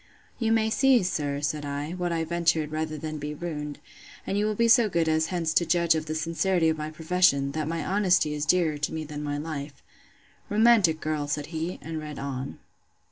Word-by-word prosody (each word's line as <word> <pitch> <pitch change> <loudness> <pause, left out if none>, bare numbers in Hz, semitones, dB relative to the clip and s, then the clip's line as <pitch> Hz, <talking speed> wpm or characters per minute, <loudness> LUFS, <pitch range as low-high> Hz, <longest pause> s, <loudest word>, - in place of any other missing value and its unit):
You 225 -2 +1
may 220 -1 +2
see, 260 -1 +4
sir, 145 -5 -2
said 150 +1 -2
I, 145 +2 -4
what 180 -1 -2
I 165 -1 0
ventured, 165 -2 0
rather 155 0 -3
than 155 0 -5
be 150 +1 -5
ruined; 150 -3 -5 0.5
and - - -2
you 205 +1 +1
will 215 - -1
be 235 +2 +3
so 230 -1 +5
good 170 -3 +1
as 160 0 +2
hence 165 -3 -1
to 170 - +4
judge 170 0 +3
of 155 -1 -3
the 155 - -3
sincerity 165 +2 +1
of 160 - 0
my 155 0 -3
profession, 155 -3 +2
that 155 0 -3
my 165 -1 -3
honesty 185 -6 +2
is 150 0 -3
dearer 160 -4 +2
to 150 - -2
me 160 - -3
than 150 -1 -7
my 145 -1 -3
life. 145 -2 -6 0.7
Romantic 210 -7 +4
girl! 155 -2 -2
said 150 0 -2
he, 165 +3 -3
and 160 0 -4
read 150 -1 -7
on. 135 -1 -5
160 Hz, 210 wpm, -26 LUFS, 150-180 Hz, 0.7 s, so